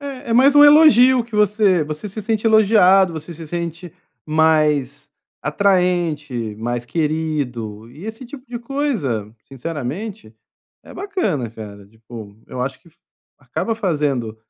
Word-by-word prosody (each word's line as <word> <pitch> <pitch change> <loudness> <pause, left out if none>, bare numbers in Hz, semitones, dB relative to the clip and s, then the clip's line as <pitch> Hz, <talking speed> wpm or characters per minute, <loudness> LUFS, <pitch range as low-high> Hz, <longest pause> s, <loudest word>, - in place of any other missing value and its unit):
É, 275 -4 -8
é - - +2
mais 265 +4 +5
um 290 0 +8
elogio 260 -5 +6
que 230 - -13
você 205 -5 +2
você 155 +7 -6
se 205 +3 -7
sente 220 +1 -1
elogiado, 195 -4 +5
você 160 +2 -8
se 165 0 -10
sente 170 +1 -6 0.3
mais 150 -3 +1 0.3
atraente, 155 - 0
mais 120 +1 -3
querido 135 -8 -3
e 150 +9 -12
esse 225 +4 -8
tipo 255 +1 -11
de 245 -1 -6
coisa 230 - -3
sinceramente 145 - -6 0.5
é - - -14
bacana, 205 - -2
cara, 100 -3 -11
tipo, 110 -1 -12
eu 125 - -7
acho 130 +2 -4
que 170 - -22 0.5
acaba 140 - -3
fazendo 145 - -2
165 Hz, 135 wpm, -19 LUFS, -, 0.5 s, um